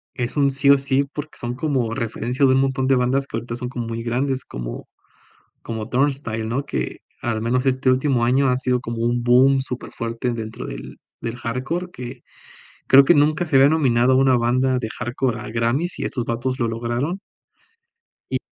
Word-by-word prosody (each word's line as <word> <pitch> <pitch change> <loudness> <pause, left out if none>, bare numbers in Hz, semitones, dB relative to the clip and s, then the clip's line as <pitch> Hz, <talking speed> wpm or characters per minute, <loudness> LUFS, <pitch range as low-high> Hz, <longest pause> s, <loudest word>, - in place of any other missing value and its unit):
es 120 +1 -3
un 140 -1 +3
sí 140 +1 +2
o 140 - +8
sí, 135 0 +2
porque 150 +2 -8
son 120 -1 -4
como 130 -5 -1
referencia 115 +4 -1
de 130 - +5
un 130 - +3
montón 135 -1 0
de 135 - +4
bandas 135 +2 +1
que 115 - -4
ahorita 115 +1 -5
son 125 0 -5
como 120 -3 -5
muy 115 0 -4
grandes, 130 +2 -1
como - - -7 0.7
como 110 -1 -5
Turnstile, 130 -4 0
¿no?, 130 +5 -2
que - - -3 0.2
al 110 -2 -1
menos 125 +3 0
este 130 0 +2
último 130 -2 +2
año 130 +2 +3
ha 125 - +2
sido 125 -1 0
como 115 -1 -5
un 120 0 0
boom 130 +2 +5
súper 125 -1 -5
fuerte 115 +1 -3
dentro 110 -1 -6
del - - -8 0.2
del 115 +1 -4
hardcore 130 +10 -3
que 125 -1 -8 0.7
creo 140 +1 +8
que 175 - +6
nunca 155 +4 +2
se 145 - -1
había 135 +1 +7
nominado 130 -5 +3
a - - +4
una 135 -1 +4
banda 125 +2 +1
de 110 -2 -4
hardcore 120 -1 -1
a - - -7
Grammy's, 120 +10 0
y - - -2
estos 120 -3 -3
vatos 130 +3 -2
lo 115 - +1
lograron 120 - -2 1.1
Y - - +1
125 Hz, 200 wpm, -22 LUFS, 115-135 Hz, 1.1 s, o